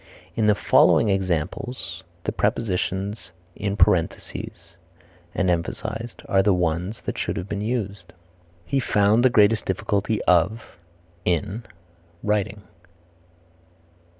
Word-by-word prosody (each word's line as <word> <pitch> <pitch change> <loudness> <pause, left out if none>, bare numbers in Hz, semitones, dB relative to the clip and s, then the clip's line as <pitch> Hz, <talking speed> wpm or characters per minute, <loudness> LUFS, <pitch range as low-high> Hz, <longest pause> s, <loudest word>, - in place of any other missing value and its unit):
In 110 - +2
the 105 - +5
following 105 - +4
examples 95 +6 -2 0.2
the - - -1
prepositions 100 0 -1 0.3
in 100 0 -2
parentheses 85 -1 0 0.6
are 100 +4 -1
the 95 -1 +3
ones 90 +4 -1
that - - -4
should - - -2
have 90 - -4
been 100 0 -3
used: 100 -6 -3 0.5
"He 135 +10 0
found 105 -1 +3
the 130 - +6
greatest 110 -1 +4
difficulty 100 +3 0
of 90 +3 +1 0.4
(in) 100 +6 -1 0.6
writing." 105 -1 -1
100 Hz, 100 wpm, -24 LUFS, 90-110 Hz, 0.6 s, the